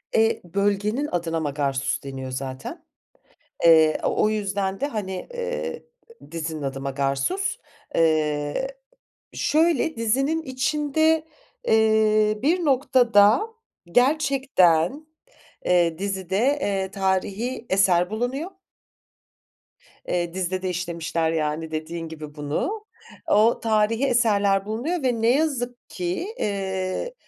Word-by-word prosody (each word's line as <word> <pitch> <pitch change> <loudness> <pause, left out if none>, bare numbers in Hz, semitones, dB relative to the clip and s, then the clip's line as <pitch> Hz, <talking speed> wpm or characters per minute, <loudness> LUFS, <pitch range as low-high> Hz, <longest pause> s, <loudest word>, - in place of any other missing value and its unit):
Eee, 225 0 +3
bölgenin 205 - 0
adına 165 -2 -1
Magarsus 140 -3 -1
deniyor 130 -1 -6
zaten. 130 0 -6 0.8
Eee, 160 -2 +6
o - - +1
o 215 - +4
yüzden 200 -2 -2
de, 285 - 0
hani, 195 -7 -5
eee, 480 0 -4 0.5
dizinin 160 -2 -4
adı 135 -1 -4
Magarsus. 140 - -1 0.4
Eee, 155 - +1 0.7
şöyle 320 0 +2
dizinin 270 +8 +1
içinde, 300 +3 +1 0.4
eee, 215 -1 +3
bir 335 +4 +1
noktada 245 -5 +4 0.4
gerçekten, 265 - +2 0.6
eee, 170 -2 +3
dizide, 190 -1 -2 0.2
eee, 195 -3 -1
tarihi 200 +5 -1
eser 180 -2 +3
bulunuyor. 250 - -3 1.6
Eee, 175 -1 -1
dizide 185 0 -2
de 185 - -2
işlemişler, 170 -2 -2
yani, 160 0 -2
dediğin 165 +1 -4
gibi 155 -2 -9
bunu. 160 - -3 0.4
O 220 +3 +4
tarihi 220 +3 +2
eserler 205 -6 +2
bulunuyor 265 +10 -2
ve 245 -3 0
ne 225 - +3
yazık 255 -4 -1
ki, 180 - -3
eee, 190 - -2
200 Hz, 105 wpm, -24 LUFS, 165-255 Hz, 1.6 s, Eee